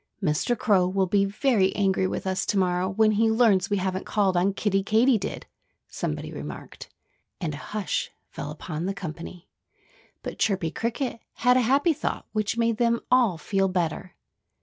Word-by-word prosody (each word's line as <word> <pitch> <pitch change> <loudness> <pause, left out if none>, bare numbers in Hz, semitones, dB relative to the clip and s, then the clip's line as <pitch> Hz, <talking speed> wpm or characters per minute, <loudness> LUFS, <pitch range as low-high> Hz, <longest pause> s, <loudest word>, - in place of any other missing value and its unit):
"Mr. 195 +6 0
Crow 190 -5 +3
will 190 +1 +1
be 195 +2 +2
very 200 -2 +1
angry 190 -2 +2
with - - -4
us 190 0 0
to 205 - 0
morrow 180 0 +1
when 215 +2 +3
he 220 +2 +3
learns 220 -5 +3
we 205 - +1
haven't 190 0 -2
called 200 -3 +1
on 180 +3 +3
Kiddie 195 0 0
Katydid," 220 +2 +1 0.4
somebody - - -4
remarked. - - -8 0.5
And 160 -5 -3
a - - -5
hush 210 +5 -3 0.2
fell 145 - -6
upon 155 +2 -5
the 195 - -2
company. 175 -1 -8 0.8
But - - -6
Chirpy 190 -6 +1
Cricket 230 - -3
had 250 0 +3
a 255 - +4
happy 275 +7 +3
thought, - - -3
which 215 +1 -1
made 230 -1 +1
them 235 0 +2
all 245 -9 +4
feel 195 +3 0
better. 180 -1 -2
195 Hz, 170 wpm, -26 LUFS, 185-225 Hz, 0.8 s, a